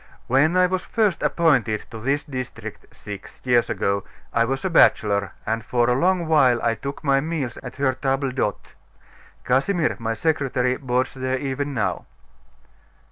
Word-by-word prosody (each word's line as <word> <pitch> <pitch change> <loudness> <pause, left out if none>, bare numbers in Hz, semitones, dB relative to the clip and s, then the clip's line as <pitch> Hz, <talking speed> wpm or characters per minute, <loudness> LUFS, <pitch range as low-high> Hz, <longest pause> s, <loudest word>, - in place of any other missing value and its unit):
When 145 +8 +3
I 185 - +6
was 185 0 -1
first 210 -6 0
appointed 125 -10 +2
to 115 - -7
this 140 +6 0
district, 125 -6 -7
six 100 -2 -10
years 120 -2 +3
ago, 100 0 0 0.3
I 115 0 +3
was 135 +7 -2
a - - +1
bachelor, 100 -10 +3
and 110 +1 -1
for 120 0 +1
a 125 - +3
long 175 +6 +2
while 135 -7 +4
I 115 - +2
took 140 +4 -6
my 135 -2 +3
meals 150 -6 -3
at 125 - -8
her 135 -1 +1
table 135 +1 -1
d'hote. 115 -6 -3 0.7
Casimir, 155 +7 +1
my 115 0 -2
secretary, 130 -4 0
boards 130 -1 -1
there 130 0 -2
even 140 +1 -3
now." 95 -6 -2
130 Hz, 160 wpm, -23 LUFS, 115-145 Hz, 0.7 s, I